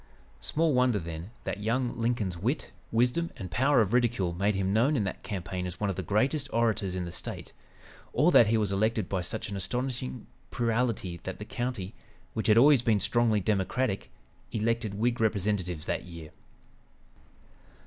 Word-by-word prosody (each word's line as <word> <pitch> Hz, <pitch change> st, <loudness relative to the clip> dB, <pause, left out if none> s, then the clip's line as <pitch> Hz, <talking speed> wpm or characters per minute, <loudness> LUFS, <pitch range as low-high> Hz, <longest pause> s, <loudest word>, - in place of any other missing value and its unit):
Small 160 Hz, -1 st, +1 dB
wonder, 125 Hz, -3 st, +3 dB
then, 85 Hz, 0 st, -6 dB
that -, -, -3 dB
young 120 Hz, +3 st, 0 dB
Lincoln's 115 Hz, -6 st, -1 dB
wit, 115 Hz, -, -2 dB, 0.2 s
wisdom 125 Hz, +9 st, +2 dB
and 90 Hz, -2 st, -7 dB
power 135 Hz, +4 st, +4 dB
of 105 Hz, 0 st, 0 dB
ridicule 120 Hz, -8 st, +2 dB
made 100 Hz, +4 st, +1 dB
him 95 Hz, 0 st, 0 dB
known 125 Hz, +8 st, +3 dB
in 115 Hz, -, +1 dB
that 95 Hz, -, -4 dB
campaign 90 Hz, -2 st, -4 dB
as 90 Hz, 0 st, -7 dB
one 105 Hz, -2 st, 0 dB
of -, -, -5 dB
the 95 Hz, -, -3 dB
greatest 130 Hz, -, 0 dB
orators 110 Hz, -5 st, +1 dB
in 90 Hz, -1 st, -2 dB
the 85 Hz, -, -6 dB
State, -, -, -6 dB, 0.6 s
or 150 Hz, +8 st, +4 dB
that 115 Hz, -, +7 dB
he 110 Hz, +1 st, +3 dB
was 105 Hz, -3 st, 0 dB
elected 110 Hz, 0 st, +1 dB
by 95 Hz, -2 st, -1 dB
such 110 Hz, +5 st, -3 dB
an 100 Hz, -, -4 dB
astonishing 120 Hz, -, -3 dB, 0.2 s
plurality 115 Hz, -6 st, -1 dB
that -, -, -6 dB
the -, -, -7 dB
county, 120 Hz, -5 st, -4 dB, 0.4 s
which 110 Hz, -, -2 dB
had 110 Hz, 0 st, +6 dB
always 140 Hz, +1 st, +7 dB
been 110 Hz, -4 st, +2 dB
strongly 115 Hz, -1 st, +2 dB
Democratic, 100 Hz, +3 st, 0 dB, 0.4 s
elected 115 Hz, -1 st, -1 dB
Whig 120 Hz, +3 st, 0 dB
representatives 100 Hz, -6 st, 0 dB
that -, -, -2 dB
year. 85 Hz, -3 st, -10 dB
110 Hz, 170 wpm, -29 LUFS, 95-120 Hz, 0.6 s, that